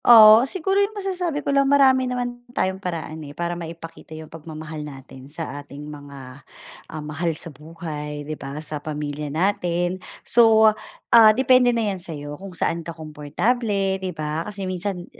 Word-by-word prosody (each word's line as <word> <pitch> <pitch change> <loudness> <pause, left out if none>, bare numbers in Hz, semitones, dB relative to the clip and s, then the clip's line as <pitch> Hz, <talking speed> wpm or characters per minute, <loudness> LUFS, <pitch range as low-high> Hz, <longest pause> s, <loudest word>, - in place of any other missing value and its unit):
Oo, 225 +1 +9
siguro 385 +3 +1
yung 410 +1 -1
masasabi 360 -7 -2
ko 280 - +1
lang 275 -1 +3
marami 265 -2 +5
naman 245 -1 -3 0.2
tayong 190 +1 0
paraan, 165 -3 -5
eh, 145 -1 -10
para 170 0 -1
maipakita 165 -2 -9
yung 160 0 -11
pagmamahal 155 -1 -7
natin 135 -2 -10
sa 145 -2 -6
ating 145 +1 -10
mga, 140 -2 -10 0.5
ah, 155 -1 -6
mahal 155 +3 -2
sa 165 - -8
buhay, 150 -1 -7
'di 155 - -4
ba, 140 -1 -7
sa 150 -1 -5
pamilya 150 -1 -4
natin. 175 +2 0 0.2
So, 220 -2 +6 0.4
ah, 225 -2 +9
depende 255 -1 +5
na 230 -2 +1
'yan 185 - -7
sa'yo 145 -4 -7
kung 195 - -7
saan 170 -1 -1
ka 165 0 -8
komportable, 190 - -1
'di 190 - -2
ba? 155 -2 -3
Kasi 200 -2 -5
minsan 185 0 -3
170 Hz, 165 wpm, -23 LUFS, 150-225 Hz, 0.5 s, Oo